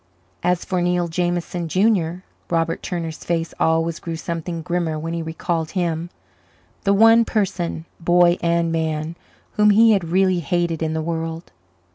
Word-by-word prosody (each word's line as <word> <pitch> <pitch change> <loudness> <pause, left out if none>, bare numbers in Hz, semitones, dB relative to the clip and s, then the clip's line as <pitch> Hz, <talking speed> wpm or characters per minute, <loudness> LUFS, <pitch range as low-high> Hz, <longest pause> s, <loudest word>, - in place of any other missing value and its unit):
As 180 0 0
for 185 -2 -1
Neil 175 0 +1
Jameson, 175 0 -2
Junior, 185 -2 +1 0.3
Robert 165 -1 0
Turner's 165 -3 -5
face 165 -1 -2
always 165 0 +1
grew 165 -1 -5
something 165 0 -4
grimmer 170 -2 -1
when 165 +2 -4
he 170 - -2
recalled 160 0 -2
him 170 -1 -1 0.8
the 200 - +4
one 225 +3 +6
person, 190 -7 -2
boy 175 +1 +4
and 170 -1 +1
man, 160 0 -2 0.4
whom 210 0 +5
he 225 +2 +6
had 195 -5 +2
really 185 0 +3
hated 170 0 -1
in 160 0 -1
the 160 - -1
world. 165 0 -4
170 Hz, 150 wpm, -21 LUFS, 165-180 Hz, 0.8 s, one